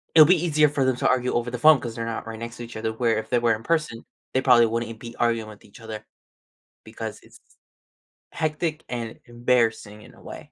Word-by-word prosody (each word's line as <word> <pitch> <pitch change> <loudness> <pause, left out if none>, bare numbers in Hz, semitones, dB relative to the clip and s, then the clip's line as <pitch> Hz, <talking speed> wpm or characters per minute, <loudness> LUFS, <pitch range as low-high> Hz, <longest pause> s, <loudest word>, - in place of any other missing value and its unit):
it'll 155 -2 +9
be 185 +1 +5
easier 150 -2 +3
for 140 -2 0
them 130 -1 +2
to - - +1
argue 125 0 +1
over 120 +1 -1
the 125 - -3
phone 155 +1 +7
'cause 120 -3 -6
they're 115 -1 -4
not 115 - -4
right 115 -1 -6
next 115 +1 -7
to 120 - -7
each 115 -1 -9
other, 110 0 -2
where 115 -1 +1
if 110 0 -5
they 120 - +3
were 115 -1 +2
in 110 - -11
person 155 -8 -1 0.3
they - - +4
probably 125 -3 +6
wouldn't 115 0 -4
be 120 -1 -9
arguing 115 -2 0
with 105 - -14
each 100 - -16
other 110 -1 -8 0.8
because - - -7
it's - - -18 0.9
hectic 155 0 -2
and 115 -2 -5
embarrassing 120 -3 0
in - - -16
a - - -19
way. - - -11
120 Hz, 230 wpm, -24 LUFS, 115-130 Hz, 0.9 s, it'll